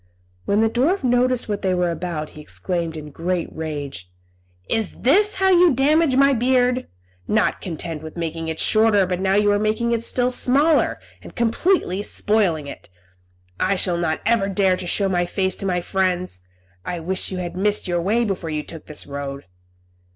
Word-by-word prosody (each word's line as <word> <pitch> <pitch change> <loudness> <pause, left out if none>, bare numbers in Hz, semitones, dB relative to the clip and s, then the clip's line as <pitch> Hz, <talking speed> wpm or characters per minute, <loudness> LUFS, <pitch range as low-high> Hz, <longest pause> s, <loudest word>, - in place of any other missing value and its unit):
When 205 +2 +2
the 225 - +4
dwarf 285 - +1
noticed 250 0 +2
what 205 -2 -3
they 185 -1 +1
were 180 -1 +1
about, 165 -3 -4
he 155 - -11
exclaimed, 170 +1 -4
in 150 -1 -8
a - - -16
great 175 +3 -3
rage, 145 - -6 0.6
"Is 220 -3 -1
this 405 - +2
how 385 0 +2
you 355 -1 +6
damage 295 +2 +3
my 275 +1 +5
beard? 250 +1 +1 0.4
Not 215 -1 +1
content 165 -2 -5
with 160 +2 -9
making 165 -1 -4
it 160 0 -4
shorter 215 -3 +4
before, 180 +1 -3
you 205 0 +3
are 205 - +2
now - - -1
making 220 +2 0
it 230 -1 0
still 250 +1 +1
smaller, 285 +6 +2 0.2
and - - -13
completely 235 - +1
spoiling 200 -8 +1
it. 140 - -10 0.7
I 200 - +2
shall 180 -2 0
not 160 -2 -1
ever 225 -4 +2
dare 190 -1 +2
to 180 -1 -6
show 195 +3 +2
my 175 -2 0
face 190 0 -1
to 195 - -3
my 180 -1 0
friends. 185 - -1 0.4
I 175 - -4
wish 185 +4 -1
you 185 - -4
had 180 -1 -5
missed 205 +2 0
your 175 -1 0
way 220 +7 +1
before 190 -5 -3
you 155 -1 -2
took 165 0 -10
this 150 - -4
road." 140 -1 -6
190 Hz, 190 wpm, -21 LUFS, 170-235 Hz, 0.7 s, you